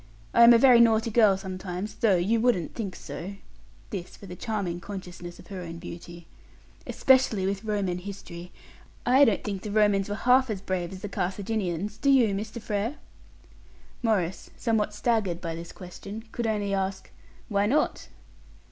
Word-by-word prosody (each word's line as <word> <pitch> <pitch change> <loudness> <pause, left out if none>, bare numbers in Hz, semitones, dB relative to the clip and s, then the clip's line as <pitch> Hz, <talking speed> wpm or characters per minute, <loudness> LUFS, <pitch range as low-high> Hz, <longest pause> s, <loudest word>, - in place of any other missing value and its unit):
I 235 - +7
am 235 - +10
a 235 - +8
very 245 0 +7
naughty 225 0 +4
girl 215 -4 +5
sometimes, 190 +1 -5
though 215 -3 +3
you 210 +6 +1
wouldn't 225 -10 +1
think 200 -5 -4
so" 195 +4 -7 0.6
(this 185 -4 -6
with 195 -3 -11
a - - -6
charming 195 -4 -3
consciousness 175 -2 -8
of 180 - -14
her 190 -2 -6
own 165 -1 -7
beauty), 170 0 -9 0.6
"especially 255 -7 +3
with 195 +2 -2
Roman 200 -5 -1
history. 180 -2 -9 0.5
I 260 +3 +6
don't 215 -6 +1
think 200 -2 -4
the 210 - -6
Romans 205 -1 +2
were 205 - -2
half 250 +3 +3
as 210 -3 -2
brave 185 -2 -3
as 190 0 -9
the - - -2
Carthaginians; 200 0 -2
do 280 - +1
you, 245 -7 +5
Mr. 215 +4 -4
Frere?" 215 +4 -2 1.1
Maurice, 190 -6 0
somewhat 220 -3 0
staggered 210 -7 0
by 165 -2 -4
this 170 +1 -8
question, 195 +4 -9
could 235 -1 -2
only 205 -2 -1
ask, 190 0 -2 0.4
"Why 205 -2 +1
not?" 290 +7 0
200 Hz, 165 wpm, -27 LUFS, 185-225 Hz, 1.1 s, am